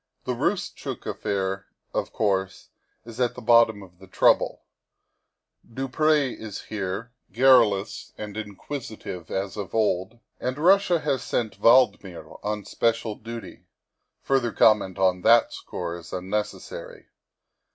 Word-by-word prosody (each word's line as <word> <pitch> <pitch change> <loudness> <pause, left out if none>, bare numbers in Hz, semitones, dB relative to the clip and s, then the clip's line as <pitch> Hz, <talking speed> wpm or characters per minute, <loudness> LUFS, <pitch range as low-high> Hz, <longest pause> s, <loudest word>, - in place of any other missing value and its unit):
The - - -2
Roostchook - - -3
affair, 95 -1 -2 0.3
of - - -2
course, 95 -3 -1 0.4
is 115 0 -10
at 125 -1 +1
the - - -7
bottom 115 -3 +4
of 90 -2 -17
the 95 - -14
trouble; - - +2 1.1
du 135 +1 -2
Pr6 150 -1 +2
is 110 -3 -7
here, 105 +3 -4 0.2
garrulous 110 -5 +3
and 105 -1 -7
inquisitive 105 - -7
as 95 +1 -3
of 100 0 -5
old, 105 -1 0 0.2
and 130 +1 -3
Russia 180 +1 +4
has 130 -3 0
sent 110 -3 -3
Valdmir 110 -7 +3
on 105 -1 -3
special 115 0 0
duty; 115 +2 -9 0.5
further 130 -4 +1
comment 100 -5 +3
on 95 -1 +2
that 115 +3 +5
score 85 - -5
is 85 -2 -11
unnecessary. 105 - -5
110 Hz, 125 wpm, -25 LUFS, 95-125 Hz, 1.1 s, that